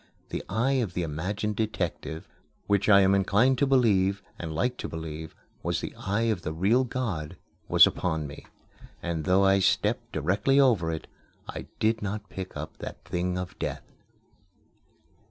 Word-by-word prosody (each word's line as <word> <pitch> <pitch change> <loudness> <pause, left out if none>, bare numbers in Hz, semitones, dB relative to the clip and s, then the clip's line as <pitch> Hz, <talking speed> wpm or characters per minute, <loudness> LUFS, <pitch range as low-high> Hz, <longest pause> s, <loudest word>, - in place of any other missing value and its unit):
The - - -4
eye 125 +7 +1
of 100 -7 -3
the 90 - 0
imagined 95 +7 -2
detective, 90 -7 -3 0.4
which, 100 0 +2
I 100 -1 +8
am 95 0 +4
inclined 105 +7 +3
to 140 - +3
believe, 100 -7 +3 0.2
and 80 -2 -4
like 125 +11 0
to - - -5
believe, 80 -1 -6 0.3
was - - -1
the - - -5
eye 100 +4 -1
of 110 -6 0
the 80 - -4
real 100 +10 +3
God, 110 -12 -3 0.3
was - - +8
upon 80 -4 -1
me; 70 +1 -9 0.6
and 85 -3 -2
though 95 +2 +4
I 95 0 +5
stepped 95 - +1
directly 100 - +2
over 110 -12 +4
it, 80 - -5 0.4
I - - -6
did 110 +1 +2
not 105 0 -4
pick 95 -1 -6
up - - -7
that - - -8
thing 90 +1 -1
of 90 0 -6
death. - - -3
95 Hz, 165 wpm, -27 LUFS, 85-110 Hz, 0.6 s, I